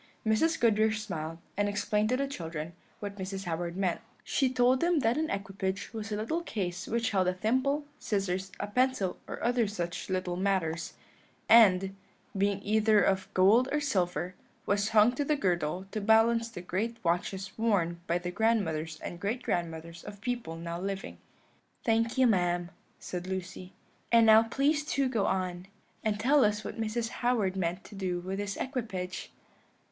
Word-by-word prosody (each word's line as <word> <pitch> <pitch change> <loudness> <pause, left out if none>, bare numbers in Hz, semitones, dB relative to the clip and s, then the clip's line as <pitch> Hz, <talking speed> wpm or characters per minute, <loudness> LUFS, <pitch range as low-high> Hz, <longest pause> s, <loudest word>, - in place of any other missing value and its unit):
Mrs. 270 +10 +2
Goodriche 220 -1 +3
smiled, 165 -6 -5 0.2
and 205 0 +1
explained 210 +1 0
to 255 - +2
the 275 - 0
children 165 - -5 0.3
what 205 -1 -5
Mrs. 195 0 -4
Howard 170 0 -3
meant: 185 -3 0 0.2
she 265 -3 +1
told 255 0 +3
them 340 -1 +2
that 230 0 +2
an 315 +2 -1
equipage 195 +1 -3
was 220 -1 -5
a - - 0
little 230 +11 -1
case 185 - -4
which 230 0 0
held 190 -3 +2
a 180 - +1
thimble, 260 +9 +1
scissors, 190 -2 -2
a - - -1
pencil, 250 -3 0
or - - -6
other 240 -1 +2
such 175 -4 -4
little 185 -1 -1
matters, 175 -3 -1 0.5
and, 195 -4 +6 0.4
being 200 0 0
either 215 0 +4
of 190 0 0
gold 220 +8 +5
or 295 - +2
silver, 185 -9 -1 0.3
was 200 +1 +1
hung 220 +1 +6
to 290 - -1
the 300 +2 +1
girdle 180 - -1
to 215 - -3
balance 225 +2 +4
the 175 - -8
great 215 +6 -2
watches 190 +3 -1
worn 180 -7 +1
by 170 - +2
the 175 0 -4
grandmothers 170 -7 0
and 175 - -6
great 220 +7 -2
grandmothers 170 0 -3
of 205 -1 -9
people 240 -8 -3
now 170 +1 -5
living. 195 0 -4 0.7
"Thank 230 +1 +1
you, 260 - +5
ma'am," 175 -5 +1 0.3
said 180 0 -6
Lucy; 185 0 -5 0.4
"and 230 -1 +6
now 220 0 +8
please 280 +6 +1
to 275 -2 0
go 230 -6 0
on, 185 -1 -2 0.4
and 210 -1 0
tell 270 +5 +4
us 210 0 +1
what 225 - -5
Mrs. 225 +1 -1
Howard 230 -7 0
meant 180 0 -2
to - - -13
do 185 -3 -2
with 190 +2 -4
this 205 -1 -3
equipage." 215 -9 -4
200 Hz, 170 wpm, -30 LUFS, 180-230 Hz, 0.7 s, now